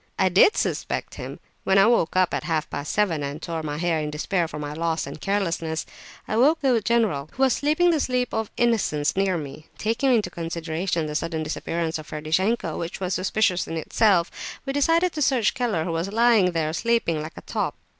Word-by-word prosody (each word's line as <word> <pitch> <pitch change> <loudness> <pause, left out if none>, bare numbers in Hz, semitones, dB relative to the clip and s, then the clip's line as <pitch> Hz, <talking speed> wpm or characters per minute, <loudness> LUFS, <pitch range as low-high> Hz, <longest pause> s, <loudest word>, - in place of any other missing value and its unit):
"I 190 - +3
did 190 - +5
suspect - - -2
him. - - -7 0.2
When 190 - +3
I 195 - +7
woke 225 -8 +2
up 185 -1 +3
at - - -2
half 160 -2 -1
past 145 - -4
seven 190 -7 +1
and 140 +1 -4
tore 165 -1 -4
my 150 -1 -4
hair 165 -1 0
in 150 -1 -2
despair 165 +3 -1
for 155 - -8
my 145 0 -5
loss 165 +1 -1
and 140 +2 -9
carelessness, 170 -5 -1 0.4
I - - -3
awoke 290 +8 +4
the 255 -5 +3
general, 200 -11 +1
who 265 - 0
was 265 - +4
sleeping 310 +4 +2
the 320 - +1
sleep 250 -2 -1
of 220 -1 -1
innocence 210 -11 +1
near 190 -2 +1
me. 155 +1 -8
Taking 230 +5 +1
into 215 -7 +2
consideration 165 0 -2
the 150 - -4
sudden 160 0 -2
disappearance 160 +1 -3
of 155 - -10
Ferdishenko, 160 +4 -1
which 170 +1 -5
was 185 -1 -2
suspicious 185 -1 +1
in 165 - -4
itself, 175 +1 +2 0.3
we 270 - -2
decided 330 +5 +2
to 305 - -4
search 250 -6 +2
Keller, 230 -10 -1
who 170 - -3
was 165 +4 -2
lying 225 -5 +4
there 160 -1 -1
sleeping 225 -7 0
like 155 +1 -8
a - - -7
top. - - -3
180 Hz, 205 wpm, -24 LUFS, 160-230 Hz, 0.4 s, I